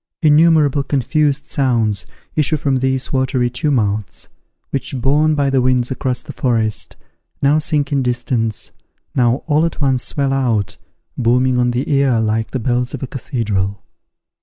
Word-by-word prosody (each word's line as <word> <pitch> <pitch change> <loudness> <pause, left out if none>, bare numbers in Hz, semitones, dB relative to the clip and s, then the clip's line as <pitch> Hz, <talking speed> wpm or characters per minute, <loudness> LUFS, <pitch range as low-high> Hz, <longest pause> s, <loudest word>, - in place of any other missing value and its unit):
Innumerable 150 -2 +4
confused 140 +1 0
sounds 115 -7 0 0.3
issue 155 0 +2
from 140 -3 0
these 130 +1 -1
watery 130 -2 +1
tumults, 110 - -1 0.4
which, 135 -1 -3
borne 150 +5 +2
by 140 -2 +1
the 135 -1 +3
winds 125 0 +1
across 130 -1 -2
the - - -9
forest, 115 -4 -1 0.4
now 145 +2 +3
sink 150 -2 -1
in 140 -1 +2
distance, 120 -3 -1 0.4
now 120 +1 +1
all 155 0 +2
at 165 - -2
once 135 -3 +1
swell 135 +3 -1
out, 115 -8 0 0.4
booming 125 +1 +2
on 125 0 +2
the 120 +2 -2
ear 135 -5 +2
like 110 0 0
the - - -3
bells 125 +2 -1
of 135 - -7
a - - -3
cathedral. 105 - -3
130 Hz, 150 wpm, -18 LUFS, 120-140 Hz, 0.4 s, Innumerable